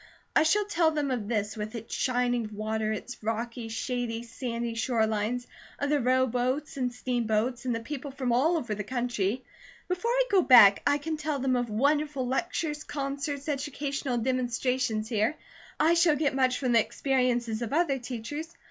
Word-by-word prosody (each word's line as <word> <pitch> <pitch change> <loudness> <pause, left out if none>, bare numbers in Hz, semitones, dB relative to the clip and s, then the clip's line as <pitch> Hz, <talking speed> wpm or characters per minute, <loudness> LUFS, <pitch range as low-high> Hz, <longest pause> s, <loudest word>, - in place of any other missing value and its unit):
I - - +6
shall 405 +7 +3
tell 340 -5 +2
them 295 -3 -1
of 230 -5 -2
this 210 -2 -1
with 215 +1 -5
its 225 -1 -7
shining 245 -3 0
water, 215 +1 -1
its 245 +3 -6
rocky, 225 +1 -3
shady, 235 0 -3
sandy 235 -1 -4
shore 230 0 +1
lines; 220 +3 -1 0.3
of 285 0 -1
the 295 - +3
rowboats 255 +3 +1
and 250 -2 -1
steam 245 -1 -2
boats, 235 +3 0
and 245 -2 0
the 230 - -3
people 280 +4 -6
from 265 -2 -2
all 310 +8 +3
over 240 -8 -3
the 210 0 -4
country. 240 -1 -1 0.4
Before 365 +6 -1
I - - +3
go 390 -2 +5
back, 235 - +8
I 285 0 +4
can 315 +2 -3
tell 305 -1 -2
them 260 -1 +1
of 245 -1 -1
wonderful 285 +4 +1
lectures, 300 +2 -2
concerts, 280 0 -4
educational 280 -2 -2
demonstrations 245 -2 0
here. 220 +5 +1 0.4
I 320 +2 +5
shall 335 -2 +4
get 290 -1 +1
much 255 -1 +2
from 255 -3 0
the 230 - +6
experiences 245 -2 0
of 235 - -3
other 295 -3 +2
teachers. 255 +6 -5
250 Hz, 175 wpm, -28 LUFS, 230-285 Hz, 0.4 s, back